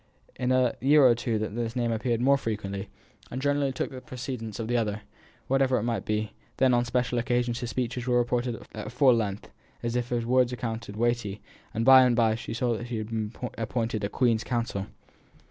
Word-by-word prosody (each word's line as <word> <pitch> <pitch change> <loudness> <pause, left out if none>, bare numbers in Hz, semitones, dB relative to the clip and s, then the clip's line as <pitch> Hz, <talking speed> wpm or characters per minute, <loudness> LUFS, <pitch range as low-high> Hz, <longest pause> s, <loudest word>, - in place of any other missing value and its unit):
In 125 0 -1
a 130 -2 +3
year 145 +2 +6
or 125 - +7
two 115 -1 -1
that 115 +2 -3
name 120 -2 0
appeared 115 +1 0
more 140 +2 +5
frequently, 105 -6 -4 0.4
and 125 - -4
generally 145 0 +1
took 130 - -3
the 130 -1 -8
precedence 125 -4 -6
of 110 - -3
the 120 - 0
other, 110 -3 -1 0.4
whatever 135 -1 +3
it - - -1
might 115 -1 -2
be; 105 0 -1 0.3
then 130 -1 +4
on 120 0 +3
special 125 0 0
occasions 120 -1 0
his 120 - -4
speeches 125 0 -3
were 125 -1 +3
reported 120 0 -1
at 110 0 -6
full 125 +1 +5
length, 105 -4 -2 0.3
as 120 0 -2
if 120 0 -1
his 120 -1 -1
words 125 0 +3
were - - -2
accounted 115 -3 -5
weighty; 120 -3 0 0.3
and 115 +2 -1
by 130 0 +9
and 125 -2 +3
by 115 -2 +3
she 110 - -6
saw 120 0 0
that 120 +2 -6
he 120 -2 -3
had 110 0 -4
been 110 -2 -2 0.3
appointed 115 -1 -2
a 100 - 0
Queen's 115 -2 +1
counsel. 115 -5 -2
120 Hz, 210 wpm, -27 LUFS, 110-125 Hz, 0.4 s, by